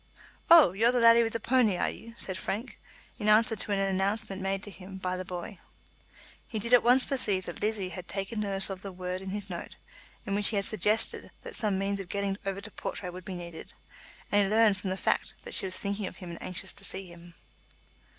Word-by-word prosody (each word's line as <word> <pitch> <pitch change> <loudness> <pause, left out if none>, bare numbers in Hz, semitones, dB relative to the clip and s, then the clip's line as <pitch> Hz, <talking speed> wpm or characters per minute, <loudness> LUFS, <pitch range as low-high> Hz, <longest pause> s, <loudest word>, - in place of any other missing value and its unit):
"Oh, 330 - +9
you're 225 +6 +3
the 250 - +1
laddie 230 0 +7
with 225 -1 -1
the 230 - -1
pownie, 230 -5 +2
are - - +1
you?" 230 0 -12
said 190 - -5
Frank, 210 +6 -4 0.4
in 210 - -2
answer 220 +1 +5
to 210 - -2
an 200 - +2
announcement 195 0 -1
made 195 +1 -2
to 205 - -5
him 190 +1 -10
by 185 -1 -2
the 185 - -4
boy. 180 +1 -7 0.9
He 225 - -4
did 235 +4 0
at 245 - +8
once 250 +2 +4
perceive 205 -9 0
that 175 - -6
Lizzie 210 -3 0
had 180 -1 -8
taken 195 +3 -3
notice 195 -2 +2
of 190 -1 -6
the 195 - -6
word 180 0 -5
in 190 - -6
his 205 0 -1
note, 175 -3 -7 0.5
in 200 - -2
which 205 0 +2
he 220 - -1
had 200 -1 +2
suggested 215 0 +2
that 480 - -8
some 210 - +2
means 200 +1 -1
of 190 -2 -7
getting 200 0 -2
over 195 0 -2
to 215 - -9
Portray 180 -2 -5
would 180 0 -10
be 190 - -5
needed, 170 -2 -9 0.6
and 205 - +4
he 195 - +1
learned 215 -2 +4
from 190 0 -4
the 185 - -2
fact - - 0
that - - -5
she 195 - +3
was 185 - +1
thinking 200 0 -2
of - - -9
him 180 -3 -8
and 170 - -9
anxious 185 +1 -4
to - - -9
see 190 0 0
him. 170 -1 -14
195 Hz, 235 wpm, -29 LUFS, 185-215 Hz, 0.9 s, Oh